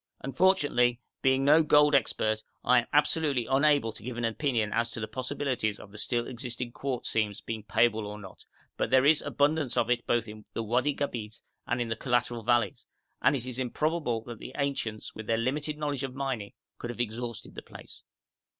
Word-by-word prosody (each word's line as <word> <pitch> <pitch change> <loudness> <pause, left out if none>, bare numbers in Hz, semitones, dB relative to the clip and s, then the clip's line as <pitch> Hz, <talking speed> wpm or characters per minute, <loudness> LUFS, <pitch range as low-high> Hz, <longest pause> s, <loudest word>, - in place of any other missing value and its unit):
Unfortunately 135 -6 +2 0.2
being 130 0 +3
no 150 +3 +7
gold 150 -1 +5
expert, 110 -4 +2 0.2
I 125 - +6
am 120 - -4
absolutely 145 -3 +2
unable 140 -3 +3
to - - -8
give 120 +1 -6
an 120 - 0
opinion 115 -2 0
as 115 0 +1
to 115 - -7
the 110 - -3
possibilities 125 -4 -2
of 100 - -12
the 105 - -10
still 120 0 0
existing 120 -1 -5
quartz 130 0 -3
seams 105 -2 0
being 110 0 -5
payable 110 +2 +2
or 105 0 -6
not, 95 -3 -12 0.3
but - - 0
there 130 0 +5
is 155 +1 +5
abundance 145 -3 +1
of 120 +1 +2
it 120 -1 0
both 120 -1 +1
in 105 0 -10
the 115 - -2
Wadi 125 +6 +1
Gabeit 115 -6 -4 0.3
and 120 - 0
in 120 -1 -1
the 115 - -1
collateral 120 -2 0
valleys, 115 -3 +1 0.3
and - - +4
it 125 -3 -2
is 130 0 -5
improbable 130 -2 -1
that 115 -2 -8
the 130 - -9
ancients 135 -6 -2
with 110 -1 -8
their 115 - +2
limited 145 +6 -1
knowledge 145 -3 -2
of 135 -2 -4
mining 130 -7 -3 0.3
could 120 - -5
have 120 - -6
exhausted 120 0 -4
the - - -7
place. - - -13
120 Hz, 195 wpm, -29 LUFS, 115-140 Hz, 0.3 s, no